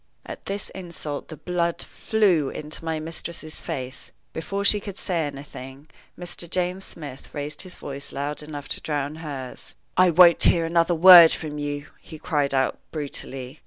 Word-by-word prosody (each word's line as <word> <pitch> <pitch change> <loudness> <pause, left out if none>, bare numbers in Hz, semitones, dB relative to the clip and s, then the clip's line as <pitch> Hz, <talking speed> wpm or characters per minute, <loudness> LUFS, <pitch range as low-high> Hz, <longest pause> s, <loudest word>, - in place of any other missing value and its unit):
At - - -9
this 200 0 -4
insult 170 -6 -6
the 155 - -9
blood 170 +1 -1
flew 185 -10 +1
into 155 +2 -5
my 160 -1 -2
mistress's 160 0 -6
face. 130 +1 -6 0.2
Before 200 +5 -3
she 210 - +5
could 200 -2 -8
say 170 -5 -1
anything, 140 0 -10 0.3
Mr. 175 -1 -6
James 180 +2 -1
Smith 145 -5 -9
raised 145 0 -3
his 185 -1 -7
voice 140 0 -6
loud 145 +2 -3
enough 150 -1 -7
to - - -3
drown 145 0 -2
hers. 140 -5 -7 0.2
"I 185 0 +6
won't 170 0 +7
hear 170 -1 +4
another 170 +1 +2
word 175 -1 +10
from 150 -1 -4
you," 145 0 -3
he 160 - -11
cried 145 -3 0
out, 135 -1 +1
brutally. 135 -2 -5
155 Hz, 165 wpm, -24 LUFS, 145-175 Hz, 0.3 s, word